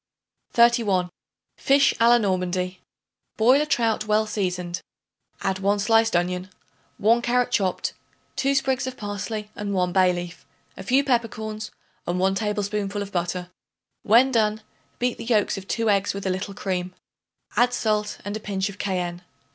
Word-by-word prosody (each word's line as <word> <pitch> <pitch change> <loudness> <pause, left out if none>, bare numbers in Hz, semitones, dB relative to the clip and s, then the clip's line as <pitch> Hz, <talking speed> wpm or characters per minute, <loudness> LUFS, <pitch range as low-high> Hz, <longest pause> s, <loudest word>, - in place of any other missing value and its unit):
31. 225 -7 +3 0.5
Fish 275 0 +4
a 230 +1 +5
la 240 - +7
Normandie. 185 -3 -1 0.6
Boil 250 +6 +5
a 300 - -1
trout 225 -6 +1
well 215 +1 +3
seasoned; 180 -4 -3 0.6
add 190 -1 0
1 200 +2 +2
sliced 225 0 +3
onion, 180 +1 -1 0.5
1 230 +3 +3
carrot 245 +1 +1
chopped, 190 -6 0 0.4
2 275 +1 +1
sprigs 265 -1 0
of 260 - -6
parsley 210 +1 -5
and 200 -1 -3
1 180 -1 +1
bay 185 -1 +5
leaf, 175 -1 -6 0.3
a - - -8
few 270 +2 +2
peppercorns 220 -4 -2 0.4
and 175 +1 0
1 190 +1 +2
tablespoonful 205 0 -2
of 200 - -10
butter. 180 0 -3 0.5
When 240 +5 +5
done, 215 -2 +1 0.4
beat 245 0 -1
the - - -5
yolks 220 -4 +2
of 195 -1 -8
2 230 +1 -1
eggs 200 0 +1
with 200 - -5
a 190 - +1
little 190 +2 -4
cream; 185 -2 -3 0.6
add 245 +1 +4
salt 210 -3 -1
and 205 +1 -3
a - - -3
pinch 200 -2 -2
of 200 - -11
cayenne. 180 -3 -2
205 Hz, 160 wpm, -24 LUFS, 185-230 Hz, 0.6 s, la